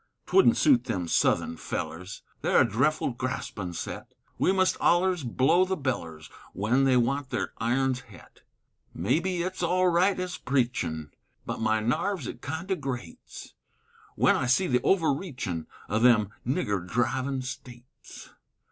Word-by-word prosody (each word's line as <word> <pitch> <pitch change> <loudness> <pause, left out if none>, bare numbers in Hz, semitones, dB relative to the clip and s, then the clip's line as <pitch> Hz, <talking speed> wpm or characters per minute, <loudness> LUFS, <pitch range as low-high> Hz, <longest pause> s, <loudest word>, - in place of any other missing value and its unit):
'Twouldn't 375 -11 +4
suit 130 -6 +4
them 95 -8 -2
Southun 80 - +1
fellers, 90 +4 -5 0.2
They're - - +4
a - - +5
dreffle 130 +3 0
graspin' 115 -8 -4
set, - - -7 0.2
We - - +3
must 185 -1 +2
ollers 175 -1 +2
blow 130 +9 +3
the 190 0 -1
bellers 85 - -4 0.3
Wen 120 +7 +2
they 130 -2 +4
want 130 +3 0
their - - -3
irons 130 +2 +1
het; 95 -6 -16 0.5
May 95 - +1
be 180 -1 -2
it's 185 +1 -4
all 180 +1 +2
right 185 +3 +2
ez 180 -1 -4
preachin', 120 - -1 0.3
But - - -4
my 110 0 +1
narves 160 - -1
it - - -7
kind 160 +6 -5
o' - - +3
grates, 125 - -7 0.6
Wen - - +4
I 125 - -1
see 130 +10 +3
the 125 -6 +2
overreachin' 140 - -1 0.2
O' 110 - 0
them 110 -4 +4 0.2
nigger 100 -7 0
drivin' 130 +7 -1
States. 125 -1 -11
130 Hz, 145 wpm, -27 LUFS, 110-170 Hz, 0.6 s, a